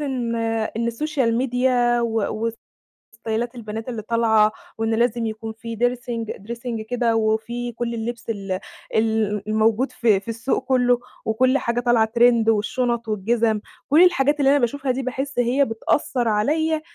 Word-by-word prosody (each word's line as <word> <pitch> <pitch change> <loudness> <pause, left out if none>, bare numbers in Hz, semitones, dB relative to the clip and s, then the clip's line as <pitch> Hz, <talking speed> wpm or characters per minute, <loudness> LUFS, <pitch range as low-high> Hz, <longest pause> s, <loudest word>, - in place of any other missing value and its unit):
إن 250 -5 -2 0.4
إن 230 0 0
السوشيال 240 -1 0
ميديا 245 -1 +2
و 225 -1 -1 0.7
وستايلات 230 +2 -3
البنات 225 +1 -6
اللي 225 -3 -4
طالعة، 220 -1 +3 0.3
وإن 225 0 0
لازم 235 0 +1
يكون 220 0 -5
في 230 +1 -7
dressing 240 -2 -2
dressing 235 -1 -4
كده، 240 -2 +1
وفي 225 +2 -1
كُلّ 235 +1 -3
اللبس 235 +1 -5
ال 195 -3 -3 0.4
ال 220 -2 +1
الموجود 220 +4 +2
في 220 -5 +2
في 200 - -22
السوق 230 +4 -2
كُلّه 245 -2 +3 0.3
وكُلّ 255 +5 +2
حاجة 235 -3 -1
طالعة 235 -2 +3
trend 235 -2 +5
والشُنَط 235 +2 0
والجِزَم، 220 +1 +1 0.3
كُلّ 310 +5 +7
الحاجات 295 -5 +3
اللي 275 -1 +4
أنا 285 - +4
باشوفها 265 +2 0
دي 260 - -2
باحس 265 +1 -3
هي 250 +4 +3
بتأثّر 235 +1 -1
عليَّ 310 +9 +1
235 Hz, 150 wpm, -22 LUFS, 220-250 Hz, 0.7 s, كُلّ